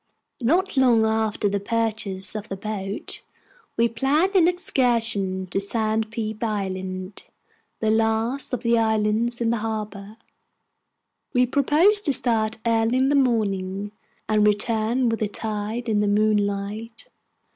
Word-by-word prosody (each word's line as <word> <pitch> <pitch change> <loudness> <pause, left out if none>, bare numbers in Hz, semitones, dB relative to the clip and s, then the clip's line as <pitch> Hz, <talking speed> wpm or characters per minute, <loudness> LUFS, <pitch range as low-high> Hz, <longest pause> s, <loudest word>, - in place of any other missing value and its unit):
Not 345 - +1
long 240 -4 +4
after 220 -1 0
the 200 0 -1
purchase 210 -3 0
of 215 0 -6
the 195 - -4
boat, 200 0 -5 0.6
we 230 +1 +4
planned 275 - +1
an 345 -3 +5
excursion 230 - +1
to - - 0
Sandpeep 220 +1 -1
Island, 190 -3 -4 0.6
the 220 -1 +2
last 225 +4 0
of 250 -1 -3
the 235 -1 +3
islands 220 +2 0
in 230 -1 +1
the 235 - 0
harbor. 215 -1 -5 1.2
We 250 0 +4
proposed 310 - +3
to 285 - +3
start 225 -3 +2
early 230 +1 +2
in 265 +1 +2
the 290 - +2
morning, 205 -6 0 0.4
and 210 -1 +3
return 225 +4 +1
with 225 -1 -1
the 215 - 0
tide 215 +3 -4
in 215 -2 +1
the 210 - +1
moonlight. 210 +1 -1
220 Hz, 135 wpm, -23 LUFS, 205-235 Hz, 1.2 s, an